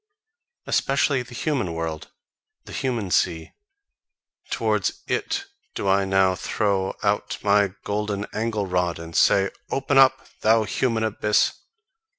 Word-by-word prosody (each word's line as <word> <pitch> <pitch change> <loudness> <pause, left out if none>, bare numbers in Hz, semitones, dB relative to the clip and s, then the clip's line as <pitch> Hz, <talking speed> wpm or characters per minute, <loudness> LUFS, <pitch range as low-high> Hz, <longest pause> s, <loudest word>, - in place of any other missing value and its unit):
Especially 135 0 +1
the 125 0 -10
human 125 - -1
world, 80 -2 -4 0.6
the - - -11
human 115 -8 -2
sea: 80 -1 +1 1.0
towards - - -1
IT 395 0 -2 0.3
do - - -3
I 95 0 +3
now 95 -1 +3
throw 95 +1 -1
out 105 0 0
my 100 -2 +3
golden 105 0 -2
angle 110 -2 -1
rod 90 -2 0
and 85 0 -9
say: 100 +4 +4 0.2
Open 135 0 +2
up, 135 0 +4
thou 110 +1 +4
human 115 +2 0
abyss! 105 -1 +2
105 Hz, 125 wpm, -24 LUFS, 95-115 Hz, 1.0 s, say